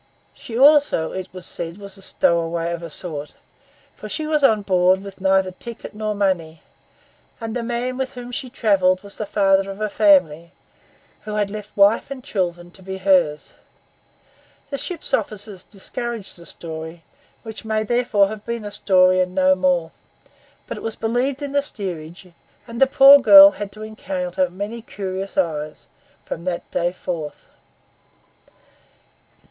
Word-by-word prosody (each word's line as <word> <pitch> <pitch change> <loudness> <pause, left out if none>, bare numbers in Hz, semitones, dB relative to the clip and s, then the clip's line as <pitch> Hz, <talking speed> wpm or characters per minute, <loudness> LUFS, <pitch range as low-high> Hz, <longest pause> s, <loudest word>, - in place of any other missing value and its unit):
She 230 - -8
also, 285 - +4
it 190 0 -6
was 185 -1 -7
said, 170 +1 -5
was 200 -1 -10
a 195 - -15
stowaway 170 -2 0
of 170 0 -4
a 170 - -7
sort; 150 -3 -6 0.6
for - - -9
she 310 - -2
was 305 -1 0
on 215 -6 +4
board 185 0 +2
with 195 -1 -11
neither 190 -1 +2
ticket 230 +5 -10
nor 215 0 -3
money; 175 -6 -1 0.8
and 225 0 -5
the 245 - -1
man 240 +2 -3
with 265 0 -3
whom 245 0 -8
she 255 +1 -5
travelled 195 -7 +2
was 200 0 -11
the 215 - -3
father 195 -1 +2
of 195 +1 -7
a 215 0 -1
family, 180 -6 +3 0.7
who 210 0 -4
had 205 -1 -1
left 210 0 -9
wife 200 +5 +4
and 270 -2 -7
children 175 -4 -3
to 190 - -18
be 190 +1 -6
hers. 180 -6 +1 1.2
The 280 - -3
ship's 355 -4 -6
officers 205 -3 -3
discouraged 225 +2 -7
the 170 -1 -14
story, 160 0 -8 0.4
which 220 -1 -8
may 220 0 -1
therefore 230 -3 +2
have 215 -1 -8
been 235 -1 -5
a 205 - -6
story 185 -2 +3
and 185 0 -1
no 185 0 +4
more; 180 -3 +1 0.7
but - - -6
it - - -8
was 225 - -3
believed 250 +5 -1
in 285 - -4
the 285 0 +2
steerage, 180 - -7 0.4
and 235 +1 -8
the 270 - +7
poor 275 +1 +8
girl 295 +2 +9
had 205 -5 -7
to 215 +1 -10
encounter 270 +5 -3
many 205 +5 -6
curious 195 -2 -6
eyes 155 -4 -2 0.4
from 170 - -6
that 180 -2 -4
day 175 0 0
forth. 170 -4 -6
200 Hz, 165 wpm, -21 LUFS, 180-230 Hz, 1.2 s, girl